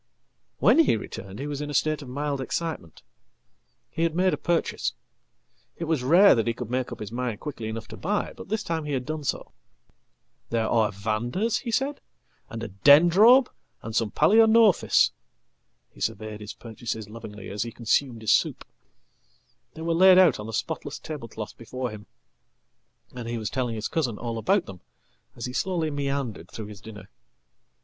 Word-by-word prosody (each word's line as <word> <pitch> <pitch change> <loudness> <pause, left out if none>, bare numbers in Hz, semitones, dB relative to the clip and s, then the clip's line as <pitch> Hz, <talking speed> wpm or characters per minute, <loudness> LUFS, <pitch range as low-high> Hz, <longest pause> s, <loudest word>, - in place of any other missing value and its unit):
"When - - +5
he 310 - +4
returned 100 -2 -8
he 140 - -5
was 145 -1 -4
in 150 - -4
a 145 - -4
state 155 0 +1
of 135 - -9
mild 140 +1 -2
excitement. 145 - -4 0.9
He - - -4
had 165 -1 +1
made 185 +1 +3
apurchase. 170 -1 -1 0.8
It - - -4
was 160 -4 0
rare 175 +10 +7
that 115 -1 0
he 115 - 0
could 120 -1 -6
make 130 0 -1
up - - -7
his 105 -1 -6
mind 120 -3 -3
quickly 135 -7 -6
enough 110 0 -5
tobuy, 205 - -2
but - - -11
this 215 0 -1
time 160 -2 -3
he 145 - -3
had 130 -2 -2
done 155 0 -4
so."There 110 - -6
are 110 -3 +2
Vandas," 115 - -1
he 245 - -6
said, 270 +5 -1 0.5
"and 115 0 -6
a 115 - -5
Dendrobe 175 - +6 0.4
and 115 -1 -6
some 115 -2 +1
Palaeonophis." 220 - +5 0.8
Hesurveyed 110 +1 -4
his 105 - -7
purchases 110 -2 -6
lovingly 105 -3 -9
as 100 0 -4
he 115 - -3
consumed 115 +1 0
his 110 - +1
soup. - - +1 1.1
They 160 - -7
were 165 0 0
laidout 185 - +6
on 105 - -6
the - - -6
spotless 145 +4 -4
tablecloth 115 -8 -7
before 125 +1 -5
him, 105 -1 -10 1.1
and 125 -2 -7
he 120 0 -3
was 110 -2 -4
telling 125 -3 -2
his 110 -1 -3
cousinall 120 -6 -2
about 195 - +2
them 95 -3 -11 0.5
as 120 - -5
he 125 - -5
slowly 170 -1 -1
meandered 140 - -3
through 110 - -7
his 105 - -11
dinner. 110 -1 -11
125 Hz, 170 wpm, -26 LUFS, 110-165 Hz, 1.1 s, rare